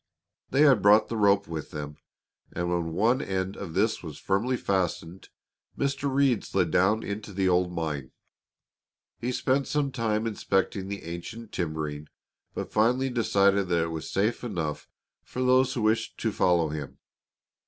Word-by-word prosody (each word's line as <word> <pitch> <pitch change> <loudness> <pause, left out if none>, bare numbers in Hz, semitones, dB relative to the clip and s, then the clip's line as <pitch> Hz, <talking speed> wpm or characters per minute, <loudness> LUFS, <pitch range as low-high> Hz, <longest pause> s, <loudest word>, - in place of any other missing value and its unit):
They 135 - +2
had 135 -8 +6
brought 105 +2 +5
the 115 - -3
rope 100 -1 +3
with 80 -3 -5
them, 75 -1 -6 0.6
and 85 0 -2
when 85 -2 -1
one 115 +9 +2
end 95 0 -2
of 85 -5 -7
this 110 +3 +1
was 80 -4 -8
firmly 115 +7 0
fastened, 90 -3 -2 0.5
Mr. 140 0 -1
Reed 135 -4 +2
slid 90 -4 0
down 100 +6 +3
into 105 +1 -5
the 95 -1 0
old 90 0 +2
mine. 75 -6 -4 1.1
He 120 +2 -2
spent 135 +2 0
some 145 -2 0
time 115 -3 -1
inspecting 95 -3 -1
the 100 0 -5
ancient 85 +7 -7
timbering, 75 -3 -3 0.5
but - - -4
finally 125 +5 +2
decided 100 -4 +2
that 85 -2 +2
it 85 - -3
was 80 -1 -5
safe 105 +6 0
enough 85 -10 -4 0.3
for 130 - -4
those 130 +1 +3
who 120 - -1
wished 110 +1 +1
to - - -1
follow 85 -3 +2
him. 75 -3 -6
100 Hz, 160 wpm, -27 LUFS, 85-115 Hz, 1.1 s, had